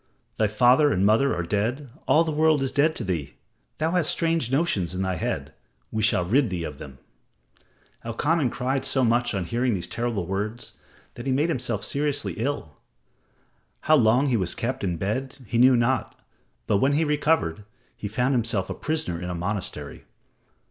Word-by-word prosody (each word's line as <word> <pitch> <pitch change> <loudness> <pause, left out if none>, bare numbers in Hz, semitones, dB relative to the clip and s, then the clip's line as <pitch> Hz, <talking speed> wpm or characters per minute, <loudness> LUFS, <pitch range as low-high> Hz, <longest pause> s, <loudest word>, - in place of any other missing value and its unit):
Thy 110 - +3
father 125 +7 +4
and 95 -3 +2
mother 115 +7 +3
are 85 - -2
dead 115 - -2 0.2
all 160 - +5
the 160 - -2
world 155 0 +3
is 135 - -1
dead 155 +3 +2
to - - -3
thee. 85 -8 -3 0.4
Thou 160 +1 0
hast 180 -3 +2
strange 165 -7 0
notions 105 - 0
in 95 - -1
thy 95 0 -1
head. 85 - -3 0.4
We 110 - -1
shall 105 -5 +2
rid 120 +6 +2
thee 90 -3 -3
of - - -7
them." 65 0 -10 1.1
Elkanan 145 +5 0
cried 130 +2 -2
so 130 - +1
much 120 -1 +1
on 95 -2 -2
hearing 120 +4 0
these 85 -2 -3
terrible 115 -6 -2
words 105 +6 -4 0.4
that 120 +3 -8
he - - +1
made 145 +6 +1
himself 120 -8 -2
seriously 140 - -1
ill. 115 - -3 1.0
How 155 - +4
long 125 0 +4
he 120 - +2
was 90 -4 -1
kept 120 0 -3
in 90 -3 -1
bed 130 +10 -3
he 115 +2 -1
knew 125 0 +6
not, 120 +1 0 0.5
but 100 - +2
when 135 +7 +2
he 155 +3 +2
recovered, 150 - +1 0.3
he 105 - -5
found 125 +6 0
himself 115 -6 0
a - - -1
prisoner 155 - -2
in 90 - -4
a 90 - -3
monastery. 90 -5 -4
120 Hz, 185 wpm, -25 LUFS, 100-140 Hz, 1.1 s, knew